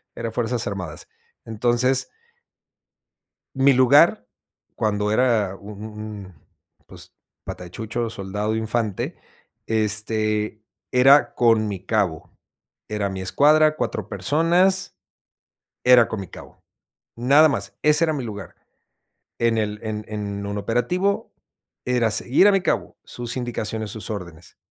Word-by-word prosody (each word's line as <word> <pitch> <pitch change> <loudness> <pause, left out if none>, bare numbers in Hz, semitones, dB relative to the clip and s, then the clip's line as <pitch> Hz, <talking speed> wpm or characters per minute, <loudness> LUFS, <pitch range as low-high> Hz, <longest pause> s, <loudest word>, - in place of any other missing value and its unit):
eran 115 - -4
fuerzas 120 +1 -2
armadas. 90 -6 -6 0.4
Entonces. 120 +4 +1 1.5
Mi 135 +1 +5
lugar 130 -3 +4 0.5
cuando 105 -1 0
era 110 -6 +1
un 100 +1 -11
un 110 -1 -10 0.3
un, 95 - -15 0.5
pues - - -13 0.3
pata - - -7
de 90 - -11
chucho, 115 +3 -4
soldado 105 +1 -3
infante, 110 -2 -2 0.5
este, 110 0 0 0.3
era 135 +3 +5
con 115 -2 +3
mi 95 -3 -7
cabo. 100 -8 -1 0.6
Era 105 -2 -1
mi 95 -1 -5
escuadra, 155 +9 +3
4 - - -3
personas, 175 +6 +1 0.9
era 125 -2 +6
con 110 - -5
mi - - -6
cabo. - - -14 0.5
Nada 140 +6 +5
más, 140 - -4
ese 150 +2 +4
era 160 - -1
mi 140 -4 -3
lugar. 105 -5 -8 0.8
En 115 -1 +2
el 105 -1 -2
en 110 -1 -4
en 100 -1 -5
un 100 0 -4
operativo 125 - -1 0.5
era 125 -3 +1
seguir 130 - +3
a - - +4
mi 195 - +3
cabo - - -2
sus 120 +1 -6
indicaciones, 110 -3 -4
sus 110 +2 -7
órdenes. 85 -6 -8
110 Hz, 125 wpm, -22 LUFS, 105-125 Hz, 1.5 s, era